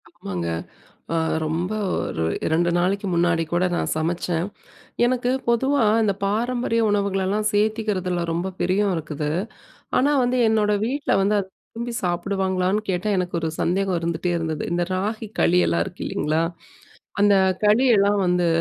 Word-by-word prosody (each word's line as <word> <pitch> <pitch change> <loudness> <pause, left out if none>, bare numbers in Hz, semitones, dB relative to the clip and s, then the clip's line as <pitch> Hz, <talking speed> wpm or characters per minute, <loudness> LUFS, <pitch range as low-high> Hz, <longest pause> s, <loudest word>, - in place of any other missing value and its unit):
ஆமாங்க. 90 -3 -5 0.7
அ - - +1 0.3
ரொம்ப 165 +5 -2 0.2
ஒரு 80 - -2 0.2
2 170 +2 +2
நாளைக்கு 195 +3 0
முன்னாடி 170 -1 +2
கூட 175 +1 +2
நான் - - -1
சமச்சேன். 165 +1 -1 0.6
எனக்கு 250 0 +1 0.2
பொதுவா 265 +2 +2 0.2
இந்த 205 -2 +2
பாரம்பரிய 230 +2 0
உணவுகளெல்லாம் 200 0 0
சேத்திகிறதுல 205 -4 0
ரொம்ப 175 +3 -2
பிரியம் 195 +2 +1
இருக்குது. 150 -1 -3 0.7
ஆனா 280 +3 +3
வந்து 245 +1 +1
என்னோட 215 -1 +2
வீட்ல 275 +4 -2
வந்து 200 +2 +2
அது 190 -1 -5 0.3
விரும்பி 235 +1 -4
சாப்பிடுவாங்களான்னு 185 +2 0
கேட்டா 185 +3 -1
எனக்கு 180 -1 -2
ஒரு 160 -1 -2
சந்தேகம் 190 +1 +1
இருந்துட்டே 170 +1 -2
இருந்தது. 160 -2 -3
இந்த 175 0 +1
ராகி 215 +4 -3
களி 180 +1 +4
எல்லாம் 85 0 +1
இருக்கு - - -9
இல்லைங்களா? 155 +2 0 0.8
அந்த 205 0 +5 0.3
களி 215 +5 +4
எல்லாம் 200 +1 +3
வந்து, 180 -1 +2
190 Hz, 140 wpm, -23 LUFS, 175-215 Hz, 0.8 s, அந்த